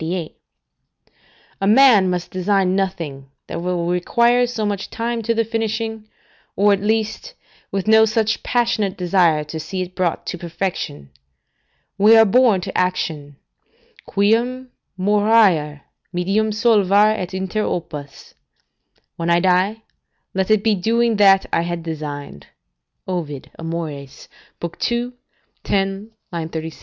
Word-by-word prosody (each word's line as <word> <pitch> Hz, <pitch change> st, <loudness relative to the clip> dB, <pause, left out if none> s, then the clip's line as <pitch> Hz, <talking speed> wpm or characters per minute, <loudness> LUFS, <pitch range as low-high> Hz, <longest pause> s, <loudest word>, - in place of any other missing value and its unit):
] 165 Hz, +2 st, -10 dB
A 195 Hz, -, +1 dB
man 220 Hz, -4 st, +6 dB
must 180 Hz, -1 st, -3 dB
design 185 Hz, 0 st, +1 dB
nothing 160 Hz, -8 st, -3 dB, 0.2 s
that 165 Hz, -, -6 dB
will 175 Hz, -1 st, -2 dB
require 235 Hz, +8 st, +2 dB
so 225 Hz, -3 st, -3 dB
much 205 Hz, -1 st, -3 dB
time 235 Hz, 0 st, -3 dB
to 230 Hz, +1 st, -1 dB
the 230 Hz, 0 st, +1 dB
finishing, 220 Hz, -1 st, -3 dB, 0.5 s
or, 205 Hz, +1 st, +4 dB
at 195 Hz, -, -1 dB
least, 220 Hz, -, -2 dB, 0.4 s
with 195 Hz, 0 st, -3 dB
no 220 Hz, 0 st, +6 dB
such 220 Hz, 0 st, 0 dB
passionate 235 Hz, -5 st, 0 dB
desire 175 Hz, -4 st, +2 dB
to 150 Hz, +2 st, -7 dB
see 185 Hz, +4 st, -4 dB
it 180 Hz, 0 st, -10 dB
brought 180 Hz, -2 st, -2 dB
to 180 Hz, -, -5 dB
perfection. 165 Hz, -, -5 dB, 0.9 s
We 215 Hz, +3 st, +7 dB
are 225 Hz, -, +7 dB
born 220 Hz, -2 st, +4 dB
to -, -, -6 dB
action: 160 Hz, -5 st, -2 dB, 0.7 s
"Quum 240 Hz, +5 st, 0 dB, 0.3 s
moriar, 200 Hz, -7 st, +3 dB, 0.3 s
medium 195 Hz, +5 st, 0 dB
solvar 210 Hz, -2 st, +4 dB
et 185 Hz, -4 st, -5 dB
inter 190 Hz, +3 st, -2 dB
opus." 150 Hz, -7 st, -6 dB, 0.8 s
["When 165 Hz, 0 st, -2 dB
I 170 Hz, -, +4 dB
shall 175 Hz, -, +2 dB
die, 190 Hz, +4 st, +1 dB, 0.5 s
let 190 Hz, +1 st, -1 dB
it 215 Hz, -1 st, +3 dB
be 220 Hz, -1 st, +3 dB
doing 230 Hz, +3 st, +1 dB
that 195 Hz, -2 st, +5 dB
I -, -, +3 dB
had 170 Hz, 0 st, -4 dB
designed." 145 Hz, -, -7 dB, 0.6 s
Ovid, 160 Hz, -7 st, -5 dB
Amor., 165 Hz, -1 st, -4 dB
ii. 140 Hz, -1 st, -9 dB, 1.5 s
10, 195 Hz, +2 st, -2 dB, 0.2 s
36. 160 Hz, -1 st, -5 dB
195 Hz, 130 wpm, -20 LUFS, 170-220 Hz, 1.5 s, We